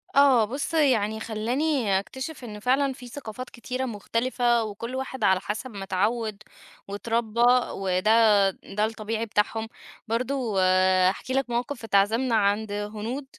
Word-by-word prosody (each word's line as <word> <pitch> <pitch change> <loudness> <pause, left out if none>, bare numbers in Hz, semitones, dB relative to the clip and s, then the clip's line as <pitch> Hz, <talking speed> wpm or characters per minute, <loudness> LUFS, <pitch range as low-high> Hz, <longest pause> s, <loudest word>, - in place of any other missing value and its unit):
آه 265 -6 +6
بُص 275 +8 -4
يعني 225 -9 +2
خلاني 230 0 0
أكتشف 265 +7 -7
إن 210 -3 -7
فعلًا 265 +4 +1
في 250 -1 -11
ثقافات 250 -1 -8
كثيرة 255 +2 -4
مختلفة 240 +1 0
وكل 225 +4 -6
واحد 265 0 -4
على 190 -1 +4
حسب 215 +6 -5
ما 200 -2 -7
اتعود 210 +2 -1 0.4
واتربى، 225 +2 -2 0.3
وده 200 +2 +3
ده 210 +3 -3
الطبيعي 220 0 -3
بتاعهم. 220 +1 -1 0.4
برضه 235 -2 -1 0.5
أحكي 255 +6 -4
لك 270 -1 0
موقف 240 +2 -3
اتعزمنا 225 +4 +2
عند 205 0 +1
هنود 215 +6 -4
225 Hz, 130 wpm, -26 LUFS, 210-255 Hz, 0.5 s, آه